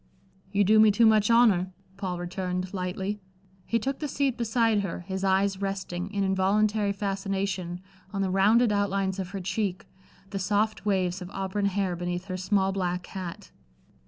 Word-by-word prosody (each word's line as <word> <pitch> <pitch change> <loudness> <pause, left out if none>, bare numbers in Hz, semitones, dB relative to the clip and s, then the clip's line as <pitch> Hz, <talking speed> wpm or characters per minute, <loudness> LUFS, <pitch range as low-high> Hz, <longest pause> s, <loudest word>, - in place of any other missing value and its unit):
"You 205 0 +3
do 215 +3 +5
me 215 0 +7
too 230 +3 +4
much 215 -1 +4
honor," 220 -6 +4 0.3
Paul 190 -3 -3
returned, 180 +1 -3
lightly. 190 +2 -3 0.5
He 230 - +2
took 265 +4 -2
the 300 - -2
seat 275 -2 0
beside 230 -2 +2
her, 195 -3 -3
his 190 +2 -5
eyes 195 0 +2
resting, 195 -2 -3
in 200 -1 0
involuntary 200 +2 +2
fascination, 195 -3 -2 0.3
on 195 -1 -1
the 190 - -1
rounded 215 +5 +4
outlines 200 -1 0
of 185 -2 -3
her 195 0 -5
cheek, 190 0 -2 0.5
the 195 - -3
soft 210 +2 0
waves 185 -2 +1
of 180 - -7
auburn 195 +1 -2
hair 195 -2 0
beneath 175 +1 -3
her 185 -2 -4
small 190 +1 +1
black 180 -2 -2
hat. 185 -3 -7
195 Hz, 165 wpm, -27 LUFS, 185-210 Hz, 0.5 s, me